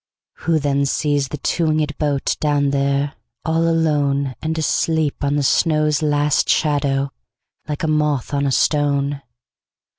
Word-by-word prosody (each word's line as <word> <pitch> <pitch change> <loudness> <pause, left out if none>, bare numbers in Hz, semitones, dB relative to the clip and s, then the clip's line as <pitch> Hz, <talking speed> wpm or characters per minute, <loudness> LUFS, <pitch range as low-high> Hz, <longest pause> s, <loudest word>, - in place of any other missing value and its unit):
Who 165 -1 0
then 140 -1 0
sees 145 -1 0
the 150 - -6
two 165 +4 -1
wingedBoat 150 -2 0
down 145 -2 +1
there, 140 0 0 0.3
all 160 0 +1
aloneAnd 150 -2 0
asleep 160 -1 0
on 140 0 +1
the 145 - +1
snow's 155 +1 +2
last 145 -1 +1
shadow, 140 -2 +1 0.6
Like 150 0 -4
a - - +1
moth 150 -3 0
on 140 0 +1
a - - 0
stone? 140 0 +1
145 Hz, 130 wpm, -20 LUFS, 140-155 Hz, 0.6 s, snow's